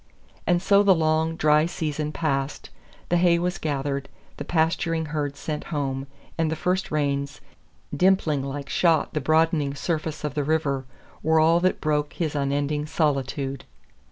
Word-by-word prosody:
And 175 0 +2
so 200 +1 +5
the 200 -2 +5
long, 160 0 +1
dry 155 0 +3
season 155 -3 -3
passed, 145 -3 -2 0.4
the 175 - +3
hay 170 -1 +4
was 180 +1 -2
gathered, 140 -2 -2 0.3
the - - -4
pasturing 165 0 0
herds 145 -2 -2
sent 150 +1 -4
home, 135 -3 -3 0.3
and 165 -1 +2
the - - 0
first 180 +4 -1
rains, 140 -1 -1 0.6
dimpling 180 -6 +2
like 140 0 -5
shot 165 0 +2
the 150 - -1
broadening 155 -1 +2
surface 155 0 -3
of 150 -2 -2
the 145 -1 -1
river, 140 -3 0 0.4
were 160 0 +3
all 165 +2 +5
that 185 +1 +1
broke 150 -1 0
his 160 -4 -2
unending 145 +1 -1
solitude. 140 -3 -1
155 Hz, 155 wpm, -25 LUFS, 140-165 Hz, 0.6 s, so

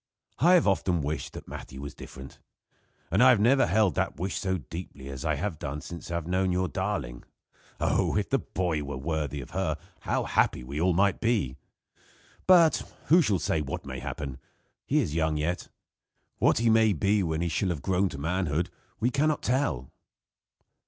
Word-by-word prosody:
"I 175 +6 +6
have 175 - +4
often 90 -4 +1
wished 75 +3 -3
that - - -9
Matthew 65 - -8
was 70 0 -6
different; 65 0 -11 0.7
and 95 +6 +3
I 130 - +8
have 120 -5 +5
never 130 +6 +4
held 95 0 +3
the - - 0
wish 90 +3 -2
so 95 -1 0
deeply 70 -2 -8
as 70 0 -6
I 80 -1 +1
have 80 +1 -3
done 70 +1 -4
since 85 +3 -8
I 85 - -2
have 85 -2 -2
known 95 +2 +1
your 90 +1 +1
darling. 95 -12 -3 0.6
Oh! - - +1
if - - 0
the - - +3
boy 85 -4 -2
were 70 -2 -5
worthy 75 -1 -2
of 65 - -11
her 90 -5 -1 0.2
how - - -1
happy - - +1
we 70 +5 -4
all 90 +1 +3
might 100 +2 +2
be! 105 - +1 0.9
But, 170 -4 +7 0.3
who 170 +4 +7
shall 105 - +2
say 80 -1 0
what 70 -2 -5
may - - -5
happen? 70 -3 -5 0.5
He - - +2
is 75 - -2
young 80 -1 +1
yet. 85 +4 -2 0.7
What - - +4
he 115 +1 +2
may 110 -1 +5
be 100 +5 +2
when 80 -3 -1
he 85 - 0
shall 90 +3 0
have 80 -6 -3
grown 95 +2 +2
to - - -7
manhood 85 +1 -1 0.3
we 120 +3 +1
can 140 +5 +2
not 155 - 0
tell." 125 - 0
85 Hz, 195 wpm, -28 LUFS, 75-100 Hz, 0.9 s, I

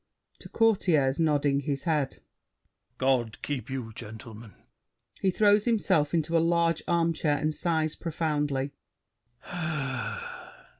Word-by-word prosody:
[To - - -11
Courtiers, 170 - +2
nodding 145 -3 +2
his 140 0 -2
head. 150 -5 -1 0.7
God 125 -4 +1
keep 145 -2 -3
you, 125 -4 -5
gentlemen! 110 0 -10 0.6
[He 190 - +2
throws 205 +2 +4
himself 170 -10 +2
into 165 0 0
a - - +6
large 165 0 +2
armchair 165 -3 +1
and 155 +2 0
sighs 160 -1 0
profoundly. 150 -4 -1
150 Hz, 105 wpm, -28 LUFS, 135-170 Hz, 0.7 s, a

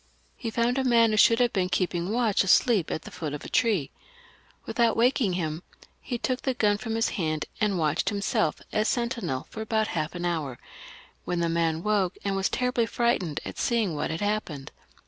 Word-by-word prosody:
He 230 - -4
found 240 +3 +1
a - - +1
man 230 -3 +4
who 215 - 0
should 230 +2 +6
have 245 -1 +2
been 185 -2 0
keeping 180 -1 -1
watch 225 -3 +2
asleep 195 -1 +3
at - - -3
the - - -11
root 150 -2 -2
of 150 - -8
a - - -7
tree. 205 - +1 0.7
Without 235 -1 +1
waking 235 -4 +3
him 160 -2 -2 0.4
he 245 - -3
took 255 +2 -2
the 265 -2 -1
gun 205 -3 +2
from 225 0 -3
his 225 +1 +1
hand, 155 -6 -2
and 210 -3 +1
watched 155 -1 +1
himself 200 -6 -1
as 215 0 +1
sentinel 235 - -1
for 220 - -6
about 220 0 0
half 155 +1 -3
an 175 0 -3
hour, 155 -8 -2 0.7
when 175 -1 -2
the 170 0 +1
man 165 0 0
woke, 205 -3 +1
and 200 -1 -1
was 195 0 +1
terribly 250 -2 0
frightened 210 -12 0
at - - -7
seeing 225 -7 +1
what 150 - -2
had 160 0 -3
happened. 205 -10 -2
205 Hz, 200 wpm, -27 LUFS, 170-230 Hz, 0.7 s, should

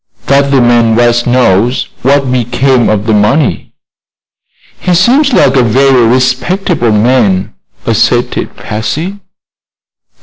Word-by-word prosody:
"That 140 0 +1
the 135 -2 +2
man 120 -2 +2
West 120 0 +1
knows 120 -1 0
what 135 0 0
became 125 +1 0
of 105 -1 -1
the 110 - 0
money." 105 +8 -1 1.0
"He 180 -1 -1
seems 260 - +2
like 135 - +2
a 130 - +3
very 125 +1 +2
respectable 130 - -1
man," 105 - 0 0.3
asserted - - -1
Patsy. 155 - -5
125 Hz, 110 wpm, -9 LUFS, 115-140 Hz, 1.0 s, a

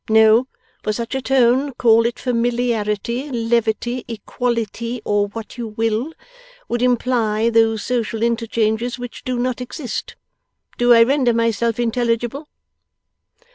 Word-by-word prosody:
No; 220 +3 +5 0.3
for 215 - -1
such 230 +2 -4
a 265 - -1
tone 265 +1 +2
call 230 -1 +4
it 235 - -5
familiarity, 235 0 -1
levity, 235 0 0
equality, 235 +1 -3
or 205 0 +1
what 225 +3 -9
you 235 - -3
will 225 +5 -1 0.6
would 240 0 -2
imply 235 -3 +1
those 225 -1 +2
social 230 -2 -1
interchanges 230 0 0
which 245 -1 -8
do 255 -1 -2
not 250 +1 -1
exist. 250 +1 -5 0.6
Do 240 0 +4
I 230 -1 +8
render 255 -1 +2
myself 230 0 0
intelligible? 240 +4 -1
235 Hz, 125 wpm, -20 LUFS, 225-245 Hz, 0.6 s, I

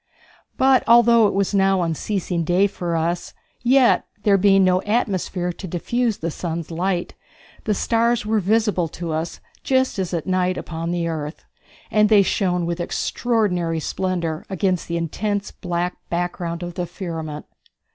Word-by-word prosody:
But, 265 -1 +4
although 235 -1 +6
it - - -2
was 200 0 0
now 195 -2 +3
unceasing 170 +1 -2
day 180 +4 +3
for 175 -4 -2
us, 170 +2 -2 0.3
yet, 255 +1 +4 0.2
there 205 -2 +4
being 195 0 +5
no 185 0 +3
atmosphere 190 -5 -1
to 190 - -8
diffuse 225 +6 -1
the 165 +1 -3
sun's 170 0 -4
light, 175 +1 -1 0.5
the 210 - +1
stars 230 +1 +1
were 215 0 +1
visible 210 -3 +1
to 170 +1 -6
us 160 +2 -4 0.2
just 260 -5 +1
as 185 -2 -2
at 170 -3 -2
night 185 -1 +1
upon 165 0 -4
the 170 -1 -1
earth, 155 -1 -5 0.5
and 210 -1 +4
they 210 -2 +6
shone 180 -3 0
with 170 +1 -3
extraordinary 180 -4 0
splendor 170 -2 -2
against 185 -2 0
the 170 - -2
intense 205 +5 -2
black 175 0 -3
background 175 0 -3
of 175 0 -5
the 175 0 -3
firmament. 165 -4 -6
180 Hz, 155 wpm, -22 LUFS, 170-205 Hz, 0.5 s, although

